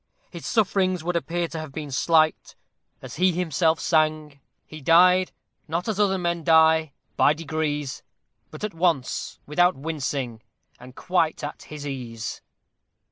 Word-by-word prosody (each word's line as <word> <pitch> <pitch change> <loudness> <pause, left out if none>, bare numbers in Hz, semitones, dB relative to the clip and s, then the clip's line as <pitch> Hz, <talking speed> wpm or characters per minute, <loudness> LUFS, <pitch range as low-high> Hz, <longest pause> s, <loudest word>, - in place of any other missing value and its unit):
His - - -8
sufferings 190 -5 +1
would 175 +1 -2
appear 170 0 -1
to 165 - -6
have 155 -2 -7
been 150 0 -6
slight: 155 +3 +2 0.5
as - - -8
he 185 +2 +4
himself 165 -1 +1
sang, 155 -3 0 0.3
He 155 -1 -11
died, 180 +5 +5 0.4
not 170 +3 -2
as 215 -2 -2
other 195 -2 +2
men, 170 -1 -1
by 160 -1 +4 0.4
degrees, 150 -3 -3 0.5
But - - -11
at 210 - -3
once, 165 -6 -1
without 175 +5 +2
wincing, 135 -5 -4 0.4
and 125 +1 -13
quite 175 -5 0
at 145 - -6
his 150 -1 -7
ease! 120 -5 -6
160 Hz, 135 wpm, -24 LUFS, 145-175 Hz, 0.5 s, died